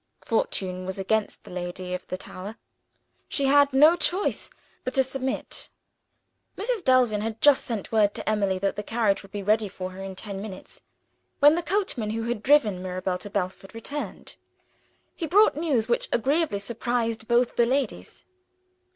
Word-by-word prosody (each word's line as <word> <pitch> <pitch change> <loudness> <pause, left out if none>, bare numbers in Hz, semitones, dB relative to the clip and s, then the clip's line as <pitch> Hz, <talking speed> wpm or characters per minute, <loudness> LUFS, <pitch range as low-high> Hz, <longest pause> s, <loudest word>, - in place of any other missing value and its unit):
Fortune 185 -4 -1
was 190 - -4
against 210 +2 -1
the - - -12
lady 180 0 -5
of 180 - -5
the 185 - -4
tower; 195 +3 -9 0.7
she 280 - +1
had 285 +1 +5
no 300 +5 +6
choice 360 +3 -1 0.3
but 255 - -4
to 265 - +4
submit. 265 0 -4 0.9
Mrs. 440 -1 -2
Delvin 250 -5 +3
had 220 0 -4
just 290 -2 +5
sent 225 -5 -4
word 210 -2 +3
to - - -5
Emily 200 -3 +1
that 195 +1 -1
the - - -3
carriage 215 -2 +1
would 195 - -16
be 205 -1 -5
ready 215 +1 +2
for 185 -1 -6
her 190 +1 -9
in 195 -1 -6
ten 195 0 -6
minutes, 200 -3 -9 0.6
when 290 +1 +7
the 340 - 0
coachman 345 - -1
who 225 +1 -2
had 235 -2 -2
driven 225 -9 +3
Mirabel 185 0 -3
to 205 - -8
Belford 195 +1 -4
returned. 285 +6 -5 0.8
He 330 - -4
brought 410 +3 +5
news 285 -8 0
which 240 - 0
agreeably 285 0 +1
surprised 230 +1 -2
both 240 0 +2
the 235 - +3
ladies. 270 +2 -2
225 Hz, 170 wpm, -26 LUFS, 195-270 Hz, 0.9 s, when